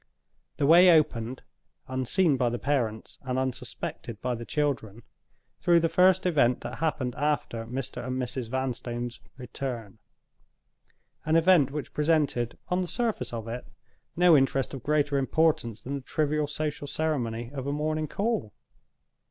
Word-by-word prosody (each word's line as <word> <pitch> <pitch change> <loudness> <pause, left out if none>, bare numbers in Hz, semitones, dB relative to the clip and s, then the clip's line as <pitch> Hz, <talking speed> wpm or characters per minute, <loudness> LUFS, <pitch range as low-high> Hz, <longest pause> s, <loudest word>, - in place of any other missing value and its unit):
The 140 - +1
way 175 +5 +8
opened 130 -7 +2 0.4
(unseen 135 +6 +2
by 125 -2 +1
the 120 - -2
parents, 120 -6 -2
and 130 -1 -3
unsuspected 125 -3 -4
by 125 +1 -1
the 120 0 -6
children) 130 -8 -2 0.6
through 175 -1 +4
the 165 0 +1
first 180 +3 +4
event 140 -8 +3
that 120 - -6
happened 150 -6 -1
after 140 -6 -1
Mr. 130 +2 -5
and 130 +1 -3
Mrs. 125 -1 -3
Vanstone's 120 -2 -3 0.2
return—an 125 +4 -8
event 165 -4 +5
which 145 +1 -6
presented, 150 -6 +1
on 180 +1 +1
the 180 - -2
surface 235 +3 -2
of 115 -1 -5
it, 120 +2 -6 0.5
no 175 -1 +6
interest 135 -1 +2
of 135 - -6
greater 145 0 +1
importance 135 -6 +1
than 135 - -5
the 140 - -3
trivial 150 +2 0
social 150 0 -4
ceremony 120 -7 -2
of 135 -1 -5
a - - 0
morning 155 +1 -1
call. 200 - -2
135 Hz, 145 wpm, -27 LUFS, 120-155 Hz, 0.6 s, way